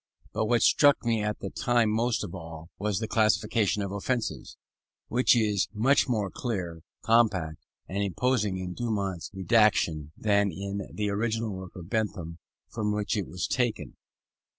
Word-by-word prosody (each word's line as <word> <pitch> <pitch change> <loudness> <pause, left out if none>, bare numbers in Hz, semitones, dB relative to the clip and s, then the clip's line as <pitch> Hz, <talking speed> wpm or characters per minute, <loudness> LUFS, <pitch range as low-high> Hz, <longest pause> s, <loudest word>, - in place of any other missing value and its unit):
But 110 - 0
what 120 +1 +3
struck 145 -4 +5
me 115 -2 +1
at 105 0 -2
that 95 - -6
time 120 -3 +2
most 115 +1 +1
of 95 - -6
all, 80 -2 -9
was 105 -1 0
the 110 - -2
Classification 110 -1 +2
of 100 - -4
Offences, 110 +4 -3 0.5
which 125 +1 +4
is 105 -4 +2
much 135 +5 +3
more 105 -6 0
clear, 90 -9 -4 0.2
compact, 100 -9 +2 0.2
and 100 +2 -2
imposing 105 0 0
in 90 -1 -4
Dumont's 100 -6 -2
rédaction 95 -6 +2
than 100 -2 +2
in 100 +3 -5
the 105 -1 -2
original 110 +1 -1
work 95 -1 -8
of 90 0 -10
Bentham 100 -7 -2 0.3
from 105 -2 -2
which 105 +1 -1
it 100 -3 -2
was 90 - -3
taken. 120 -3 -1
105 Hz, 155 wpm, -28 LUFS, 95-115 Hz, 0.5 s, struck